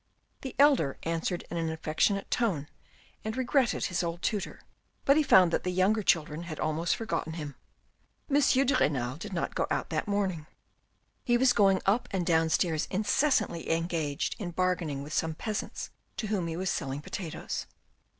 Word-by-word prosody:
The 265 - -6
elder 275 - +4
answered 165 +2 -2
in 170 - -2
an 165 -1 -1
affectionate 160 +5 0
tone 185 - 0 0.6
and 220 +3 -4
regretted 260 -1 +1
his 175 -2 -1
old 170 0 -4
tutor, 210 -3 -2 0.4
but 275 - +6
he 310 - +5
found 185 - +5
that - - +2
the 180 - -1
younger 190 +4 +2
children 160 -4 +1
had 155 -3 -7
almost 155 +2 0
forgotten 165 -7 -3
him. 150 -3 -6 0.7
M. 285 0 +3 0.2
de 280 - +2
Renal 130 -2 0
did 205 +5 -7
not 175 - -2
go - - 0
out - - -2
that - - -1
morning; 190 -6 -1 0.8
he 240 -1 +3
was 250 0 +4
going 195 -4 +4
up 210 +6 +2
and 185 -3 -1
downstairs 160 -1 +2
incessantly 205 - +1
engaged 165 -3 -1
in 190 -5 -3
bargaining 175 -5 -1
with 150 +2 -8
some 160 -1 0
peasants 215 +4 -4 0.3
to 225 - -2
whom 200 -5 -1
he 165 0 -4
was 190 +1 -1
selling 135 +1 -3
potatoes. 165 +1 -5
175 Hz, 170 wpm, -29 LUFS, 160-210 Hz, 0.8 s, but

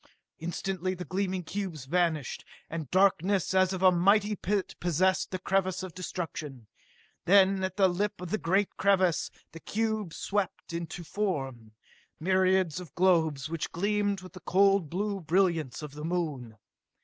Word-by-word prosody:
Instantly 185 +2 -3
the 180 0 -6
gleaming 185 +1 -2
cubes 175 -6 -5
vanished, 160 -3 0 0.3
and 160 -5 -4
darkness 190 0 +2
as 185 -1 +4
of 190 -1 -3
a 185 - +8
mighty 200 +4 +3
pit 200 0 -1
possessed 180 +2 +1
the 185 - -3
crevasse 185 0 0
of 185 -3 -7
destruction. 160 -8 -6 0.6
Then, 195 0 +5
at 190 0 -3
the 195 -2 +5
lip 195 +3 -1
of 180 -1 -7
the 215 - 0
great 195 +4 +1
crevasse, 190 -4 +2 0.2
the 165 - -10
cubes 215 -3 -2
swept 200 -4 -2
into 170 +1 -5
form 135 - -3 0.5
myriads 185 -1 +2
of 170 -6 -11
globes 160 -6 +2
which 165 0 -4
gleamed 205 +1 0
with 185 -2 -12
the 185 - -10
cold 195 -1 +3
blue 200 +4 -2
brilliance 165 -6 +1
of 150 -2 -7
the 150 +1 -8
Moon! 150 -10 -3
185 Hz, 150 wpm, -29 LUFS, 165-195 Hz, 0.6 s, a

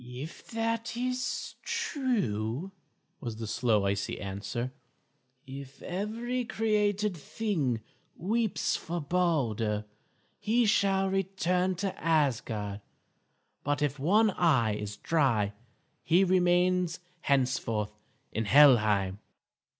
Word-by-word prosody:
"If 125 +6 -8
that 230 0 -2
is 250 0 -2
true," 195 - -1 0.5
was 120 -6 -5
the 110 0 -5
slow, 110 -1 +1
icy 100 +1 -1
answer, 105 +6 -4 0.7
"if 135 0 -9
every 230 +7 -2
created 210 -3 +1
thing 155 - -2 0.3
weeps 220 +2 0
for 170 +1 -3
Balder, 130 - 0 0.5
he 235 +2 +2
shall 195 -2 +3
return 185 -1 0
to 190 +2 -2
Asgard; 120 -10 0 0.8
but 145 +1 0
if 145 -1 -1
one 210 +9 +4
eye 135 - +3
is 105 0 -5
dry 120 -11 +1 0.5
he 175 +4 +4
remains 180 -1 +2 0.2
henceforth 125 -6 +1 0.4
in 110 +1 -2
Helheim." 105 -7 +5
160 Hz, 95 wpm, -29 LUFS, -, 0.8 s, Helheim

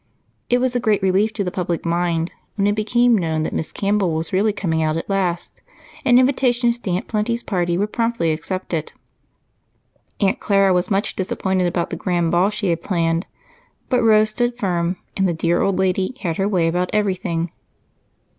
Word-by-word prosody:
It 245 - +4
was 250 0 0
a - - +2
great 215 -5 +1
relief 195 +3 +2
to 205 - -2
the 180 - -3
public 175 -2 -3
mind 170 0 0 0.2
when 200 - +1
it 205 - +3
became 235 +3 +3
known 160 -5 0
that - - -3
Miss 160 - -3
Campbell 200 -4 0
was 160 +3 -3
really 205 +3 +3
coming 165 -6 -1
out 155 0 0
at 165 - -5
last, 185 -3 -2 0.4
and 250 -3 +5
invitations 250 -2 +2
to 215 - -5
Aunt 180 +1 -1
Plenty's 230 +2 -1
party 175 -3 0
were 200 - +1
promptly 230 -6 0
accepted. 165 0 -3 1.3
Aunt 195 -2 +1
Clara 195 -2 +3
was 180 0 +1
much 195 0 0
disappointed 190 -1 -1
about 175 -1 -2
the 170 - -3
grand 175 -2 0
ball 180 +3 +3
she 210 -2 -2
had 165 0 -1
planned, 165 -2 0 0.6
but 250 -2 +2
Rose 215 -1 +4
stood 240 +2 -1
firm, 180 -4 -1 0.2
and 195 -1 +2
the 175 - 0
dear 170 +1 +1
old 195 -2 +1
lady 190 +5 0
had 170 -4 -2
her 195 - +1
way 175 -5 +2
about 180 +2 0
everything. 185 -5 -1
190 Hz, 185 wpm, -20 LUFS, 170-215 Hz, 1.3 s, and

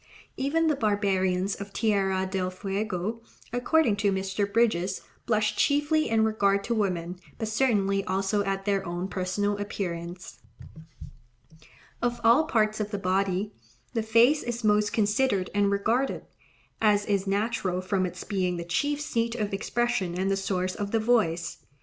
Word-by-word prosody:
Even 300 +5 +1
the 310 -2 +3
barbarians 195 -4 +1
of 200 0 -7
Tierra 195 -3 +1
del 185 -1 -2
Fuego, 195 +2 -3 0.3
according 245 -1 +2
to 205 -1 +2
Mr. 195 +1 -1
Bridges, 200 -5 +1 0.3
blush 215 -2 +1
"chiefly 295 +2 +2
in 220 -1 +3
regard 200 -2 +2
to 235 - -1
women, 180 -5 -1 0.2
but 220 - -3
certainly 205 -4 +1
also 195 +2 0
at 195 -1 -2
their 200 -2 +1
own 175 +1 -3
personal 200 +2 -1
appearance." 175 -3 -5 1.6
Of 240 0 0
all 235 +7 +5
parts 215 -4 +1
of 210 -1 -2
the 205 - -3
body, 195 +2 0 0.4
the 230 - 0
face 230 +7 +4
is 240 0 -4
most 210 -1 +3
considered 210 -2 +1
and 205 0 +2
regarded, 225 +7 0 0.6
as 205 -2 +3
is 200 -1 0
natural 200 -2 0
from 185 0 0
its 175 - -8
being 185 -3 -1
the 170 - -5
chief 285 +13 0
seat 230 -5 -1
of 210 -4 -2
expression 200 -3 -1
and 190 +1 +1
the - - +2
source 185 -1 -1
of 205 -2 -4
the 225 - +1
voice. 210 -8 +1
205 Hz, 150 wpm, -27 LUFS, 190-225 Hz, 1.6 s, all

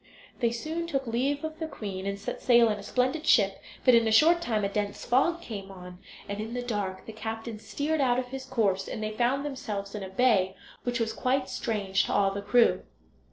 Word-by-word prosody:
They 235 - +3
soon 315 +9 -3
took 275 -5 -1
leave 265 +5 -1
of 315 0 -5
the 320 - -2
queen, 195 -8 -5
and 200 0 -2
set 200 - -5
sail 235 -2 +5
in 210 -1 -1
a - - -7
splendid 260 +9 -1
ship; 200 -5 +4 0.2
but 255 - +7
in 230 -1 +5
a - - +1
short 330 +10 +6
time 220 -9 0
a - - +2
dense 205 0 -3
fog 335 +8 +2
came 200 -4 -7
on, 180 -1 -11 0.3
and 200 +1 -4
in 225 +3 -5
the 245 - -2
dark 200 -5 -3
the 220 - -8
captain 225 0 -5
steered 295 +6 -1
out 250 -2 +3
of 250 -1 -2
his 265 +1 -6
course, 195 -7 0
and 220 - -5
they 215 - -2
found 250 +5 0
themselves 215 -8 -4
in 210 - -5
a 190 - -6
bay 190 -3 +2 0.3
which 245 0 -2
was 225 -1 -1
quite 260 +1 0
strange 200 -4 0
to - - -2
all 195 -1 +3
the 200 +1 -4
crew. 235 +3 +4
230 Hz, 225 wpm, -28 LUFS, 200-260 Hz, 0.3 s, but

